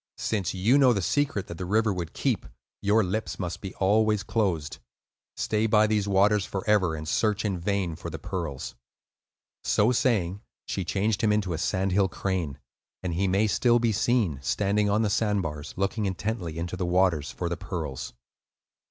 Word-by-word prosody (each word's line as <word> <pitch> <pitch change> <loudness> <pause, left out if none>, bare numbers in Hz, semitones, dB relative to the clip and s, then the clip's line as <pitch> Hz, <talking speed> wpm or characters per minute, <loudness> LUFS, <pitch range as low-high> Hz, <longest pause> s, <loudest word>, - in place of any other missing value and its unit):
"Since 100 -4 -1
you 110 +10 +4
know 130 -3 +6
the 100 - -1
secret 140 -5 0
that 85 -2 -9
the 90 - -3
river 105 +2 +2
would 85 -4 -5
keep, - - -1 0.3
your 105 +2 +3
lips 105 +4 -2
must 90 -3 -4
be 95 - -7
always 105 +1 +2
closed. 90 -11 -1 0.6
Stay 110 +1 +1
by 110 0 +5
these 105 -1 +1
waters 100 +1 +3
forever, 95 -4 +1
and 80 0 -6
search 110 +5 +1
in 95 -4 -1
vain 95 -2 -1
for 85 +1 -7
the 80 - -6
pearls." 80 -4 -5 0.9
So 105 +4 +3
saying, 105 -7 +1 0.2
she 95 - -2
changed 105 +4 0
him 110 - +3
into 105 -4 0
a 80 - -3
sand 95 +2 0
hill 95 0 +3
crane, 90 -8 -2 0.5
and 90 -2 -2
he 95 +4 +1
may 95 +3 +2
still 120 +3 +3
be 120 -1 +2
seen, 110 - +1
standing 105 +8 +1
on 105 +2 +2
the 105 - +1
sand 105 -2 +1
bars, 75 -2 -6
looking 100 +2 0
intently 95 -3 -3
into 85 +2 -3
the 90 -1 -2
water 90 -3 +3
for 85 +4 -5
the 85 - -2
pearls. 75 -9 -5
100 Hz, 180 wpm, -27 LUFS, 90-105 Hz, 0.9 s, know